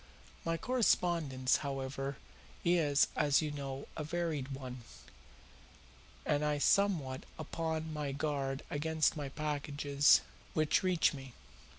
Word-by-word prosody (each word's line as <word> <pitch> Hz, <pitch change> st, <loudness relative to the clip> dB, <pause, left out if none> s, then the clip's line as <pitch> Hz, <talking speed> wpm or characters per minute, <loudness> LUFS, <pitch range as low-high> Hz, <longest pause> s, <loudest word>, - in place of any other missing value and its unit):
My 165 Hz, 0 st, 0 dB
correspondence, 170 Hz, -, +2 dB
however, 135 Hz, -1 st, -4 dB, 0.5 s
is, 160 Hz, -5 st, +4 dB
as 145 Hz, 0 st, +3 dB
you 150 Hz, -, -2 dB
know, 140 Hz, -2 st, -5 dB
a 155 Hz, -, -3 dB
varied 155 Hz, -4 st, -2 dB
one, 130 Hz, -2 st, -7 dB, 1.4 s
and 150 Hz, 0 st, +1 dB
I 150 Hz, 0 st, +1 dB
am -, -, -3 dB
somewhat 155 Hz, -8 st, +2 dB
upon 160 Hz, 0 st, -3 dB
my 150 Hz, -2 st, -2 dB
guard 140 Hz, -1 st, -2 dB
against 155 Hz, +1 st, +1 dB
any 145 Hz, -3 st, -4 dB
packages 145 Hz, -1 st, +2 dB, 0.3 s
which 155 Hz, -1 st, +3 dB
reach 180 Hz, -5 st, +3 dB
me. 135 Hz, -3 st, -9 dB
145 Hz, 115 wpm, -34 LUFS, 135-160 Hz, 1.4 s, is